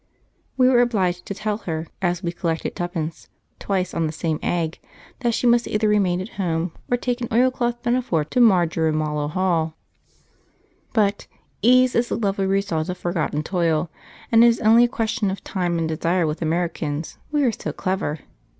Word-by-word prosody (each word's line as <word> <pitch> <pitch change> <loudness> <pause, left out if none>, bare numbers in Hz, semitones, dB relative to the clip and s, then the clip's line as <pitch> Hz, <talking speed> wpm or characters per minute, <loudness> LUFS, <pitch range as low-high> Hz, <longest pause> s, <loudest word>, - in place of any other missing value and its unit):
We 255 -1 +5
were 250 -2 +5
obliged 185 -7 0
to 200 - -4
tell 210 +1 -2
her, 160 0 -2 0.2
as 175 0 0
we 170 - -1
collected 165 -2 -3
'tuppence' 170 -2 -4 0.3
twice 185 -2 -1
on 165 -1 0
the - - -3
same 160 -1 -2
egg, 165 -2 -1 0.4
that 240 -4 0
she - - -1
must 240 0 +4
either 215 0 +1
remain 195 -4 +2
at 190 +4 -5
home, 165 -1 -1 0.2
or 245 - +2
take 245 0 -2
an 235 - -2
oilcloth 240 0 +1
pinafore 240 -11 +1
to - - +1
Marjorimallow 160 -7 +2
Hall. 165 -2 0 1.2
But 205 -3 +1 0.3
'ease 255 +2 +5
is 235 +1 +1
the - - -1
lovely 195 -3 0
result 190 -5 0
of 180 - -3
forgotten 165 -4 -2
toil,' 165 -2 0 0.4
and 230 0 +7
it - - +8
is 230 -1 +3
only 230 +2 +6
a - - +1
question 225 -2 -1
of 190 - -5
time 175 -3 -1
and 165 -1 0
desire 165 +2 0
with 155 +2 -3
Americans, 160 -2 -2
we 295 -1 +2
are 250 - +3
so - - -5
clever. 185 -6 -2
185 Hz, 175 wpm, -22 LUFS, 165-230 Hz, 1.2 s, it